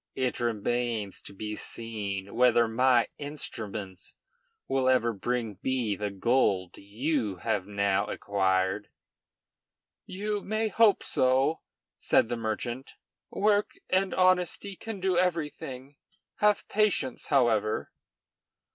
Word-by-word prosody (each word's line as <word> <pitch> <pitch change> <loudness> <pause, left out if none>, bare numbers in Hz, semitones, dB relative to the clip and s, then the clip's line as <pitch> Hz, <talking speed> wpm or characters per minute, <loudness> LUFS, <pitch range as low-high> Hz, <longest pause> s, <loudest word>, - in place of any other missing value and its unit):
It 130 -2 -1
remains 115 -2 -1
to - - -7
be 105 +2 -5
seen 100 -5 -5
whether 120 -1 +4
my 125 +1 +3
instruments 110 - -6 0.5
will 135 -1 +2
ever 120 -3 +3
bring 110 -1 -3
me 125 -6 0
the 105 +2 -3
gold 100 -3 +1
you 110 +1 -1
have 95 -2 0
now 100 -1 +1
acquired." 95 0 0 1.2
"You 205 +2 -3
may 215 +2 -1
hope 215 -2 +4
so," 130 +5 +2 0.4
said 115 - +3
the 120 - -1
merchant. 120 +3 -4 0.4
"Work 205 0 +1
and 190 +1 +2
honesty 185 +1 +2
can 220 +1 -7
do 185 -2 +2
everything; 150 -6 -3 0.4
have 210 -1 +2
patience, 205 - 0
however." 115 -6 +2
120 Hz, 110 wpm, -28 LUFS, 105-155 Hz, 1.2 s, whether